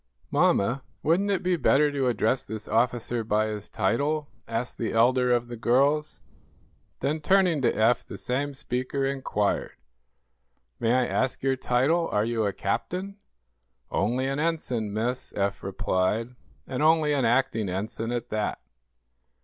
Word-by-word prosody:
"Mamma, 120 +7 +2 0.2
wouldn't 180 +6 +2
it 195 -3 0
be 180 0 +2
better 150 -1 +3
to 140 -2 0
address 120 +2 +1
this 110 +1 -7
officer 120 0 0
by 110 0 +1
his 105 -1 -5
title?" 140 +9 0 0.2
asked 115 +2 -3
the 115 - -2
elder 125 +2 +3
of 120 0 +2
the 120 - -6
girls. 140 +6 +1 0.8
Then, 150 +3 0
turning 180 -3 +3
to 125 - +3
Eph, 115 +2 +2
the - - -7
same 140 +3 -2
speaker 130 +1 -2
inquired: 130 -7 -1 1.1
"May 115 +1 +2
I 130 -1 +3
ask 130 +1 -1
your 135 0 +2
title? 135 +7 +1
Are 105 +1 +1
you 115 -2 0
a - - 0
captain?" 185 - -3 0.7
"Only 120 +7 0
an 135 +1 -1
ensign, 140 -10 -1
miss," 120 +4 -2
Eph 100 0 -1
replied, 95 +5 -1 0.3
"and 130 +1 -4
only 155 -1 +4
an 140 -2 +1
acting 115 -4 +1
ensign 110 +5 -3
at 120 0 -3
that." 105 -1 -2
125 Hz, 150 wpm, -26 LUFS, 110-145 Hz, 1.1 s, only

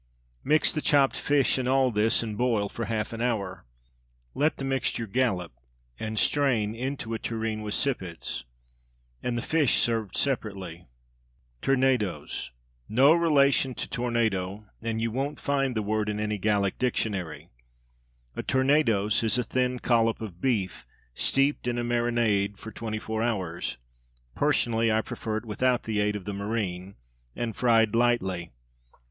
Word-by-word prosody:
Mix 150 +2 +3
the 155 - -1
chopped 140 -3 +4
fish 140 -2 +2
in 125 - -1
all 130 -1 +3
this, 110 +2 +2
and 110 -2 -4
boil 110 -3 +1
for 115 - -4
half 110 +1 -2
an 115 - -5
hour. 100 - -2 0.7
Let 150 +3 +1
the - - -5
mixture 135 -3 -1
"gallop" 95 -7 0 0.5
and 110 0 -4
strain 120 -6 +2
into 125 -1 -4
a 110 - -2
tureen 110 -1 -3
with 105 -1 -3
sippets, 90 - -2 0.8
and 120 -1 -2
the 120 - -2
fish 155 -5 +2
served 115 -4 0
separately. 100 - -2 0.7
Tournedos. 125 - 0 0.4
No 135 +7 +6
relation 140 -6 +3
to - - -4
tornado, 110 -5 -1 0.2
and 115 0 -2
you 115 0 -1
won't 135 +5 -2
find 135 -3 0
the 110 - 0
word 105 0 0
in 105 0 -2
any 105 -1 -1
Gallic 100 -1 +1
dictionary. 105 -9 -2 0.9
A - - -2
tournedos 130 -7 +2
is 110 +1 +2
a 125 - +1
thin 125 +2 0
collop 115 -2 +2
of 95 -6 -8
beef, 105 -8 0 0.3
steeped 135 - +1
in 120 0 0
a 120 - -1
marinade 120 -4 +1
for 110 - -9
twenty 110 -1 -4
four 110 0 -3
hours 95 -8 -2 0.6
(personally 115 - +2
I 110 0 +3
prefer 110 0 -4
it 110 - -6
without 125 +3 +1
the 110 -2 -1
aid 105 0 +1
of 100 - -6
the 100 - -3
marine) 100 -2 -3 0.4
and 115 -3 -3
fried 115 -3 +3
lightly. 105 -8 +1
115 Hz, 150 wpm, -27 LUFS, 105-125 Hz, 0.9 s, No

